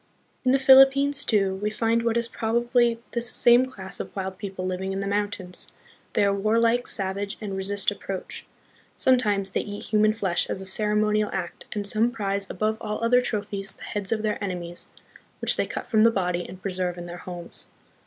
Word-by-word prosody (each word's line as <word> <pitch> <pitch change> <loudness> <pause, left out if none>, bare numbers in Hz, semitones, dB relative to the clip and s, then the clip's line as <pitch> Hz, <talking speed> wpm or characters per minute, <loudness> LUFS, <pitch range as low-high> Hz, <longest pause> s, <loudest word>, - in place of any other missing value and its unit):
In 255 - +2
the 265 - +5
Philippines, 270 +1 +6
too, 195 -3 +1
we 210 - 0
find 225 +2 0
what 230 0 0
is 235 0 0
probably 235 +1 +1
this 235 0 0
same 240 +2 +5
class 190 -7 -7
of - - -7
wild 190 -1 -5
people 190 -3 -5
living 185 +1 -3
in 195 - -3
the 200 - -3
mountains. 200 -2 +1 0.4
They - - +2
are 200 - +2
warlike, 230 +4 +1
savage, 200 +1 -3
and 205 -3 -5
resist 195 +1 0
approach. 195 -2 -7 0.5
Sometimes 205 -7 +2
they - - 0
eat 205 0 -7
human 215 0 +2
flesh 190 -6 -1
as - - -2
a 190 - -6
ceremonial 210 +1 +1
act, 180 -3 -5
and 205 -1 -3
some 220 +4 +3
prize 200 -4 -3
above 215 +3 -1
all 210 +2 -4
other 250 +2 +4
trophies 205 -4 -4
the - - -14
heads 205 -2 -1
of 220 -1 0
their 210 -1 -2
enemies, 175 -3 -5 0.5
which - - +2
they - - -1
cut - - -5
from 215 -2 +3
the 230 - +7
body 180 -5 -2
and 185 0 -11
preserve 180 -2 -2
in 175 - -7
then* 175 0 -8
homes. 175 -2 -8
205 Hz, 195 wpm, -25 LUFS, 190-230 Hz, 0.5 s, the